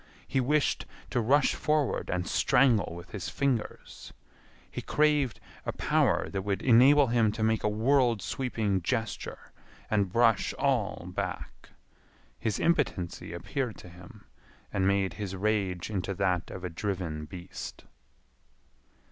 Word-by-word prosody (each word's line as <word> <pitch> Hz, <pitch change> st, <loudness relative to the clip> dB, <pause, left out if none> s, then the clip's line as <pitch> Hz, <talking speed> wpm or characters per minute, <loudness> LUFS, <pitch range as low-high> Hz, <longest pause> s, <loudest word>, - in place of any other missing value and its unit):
He 135 Hz, -, 0 dB
wished 145 Hz, +3 st, +1 dB, 0.2 s
to 120 Hz, -, +1 dB
rush 140 Hz, +6 st, +3 dB
forward 150 Hz, -3 st, 0 dB
and 90 Hz, -1 st, -1 dB
strangle 115 Hz, -10 st, +3 dB
with 85 Hz, +1 st, -10 dB
his 100 Hz, -4 st, -5 dB
fingers. 135 Hz, -6 st, -3 dB, 0.6 s
He -, -, -5 dB
craved 150 Hz, -5 st, +2 dB, 0.2 s
a -, -, -2 dB
power -, -, +1 dB
that 95 Hz, -, -2 dB
would 100 Hz, 0 st, -2 dB
enable 135 Hz, +4 st, +6 dB
him 115 Hz, -3 st, +3 dB
to 110 Hz, 0 st, -3 dB
make 110 Hz, 0 st, +1 dB
a 105 Hz, -, +2 dB
world 120 Hz, +1 st, +2 dB
sweeping 110 Hz, -4 st, -1 dB
gesture 115 Hz, +5 st, -3 dB, 0.4 s
and 100 Hz, -4 st, +1 dB
brush 115 Hz, -2 st, +3 dB
all -, -, 0 dB
back. -, -, -5 dB, 0.7 s
His 110 Hz, -4 st, -1 dB
impotency 135 Hz, -, 0 dB
appeared 110 Hz, +8 st, -3 dB
to 90 Hz, -, -12 dB
him, 90 Hz, +1 st, -14 dB, 0.5 s
and 95 Hz, -1 st, +1 dB
made 100 Hz, -1 st, +1 dB
his 95 Hz, -2 st, -3 dB
rage 100 Hz, -2 st, -1 dB
into 95 Hz, -1 st, -2 dB
that 90 Hz, -2 st, 0 dB
of 95 Hz, -, -8 dB
a 90 Hz, -, -3 dB
driven 85 Hz, -4 st, -3 dB
beast. 85 Hz, +3 st, -8 dB
105 Hz, 135 wpm, -29 LUFS, 95-125 Hz, 0.7 s, enable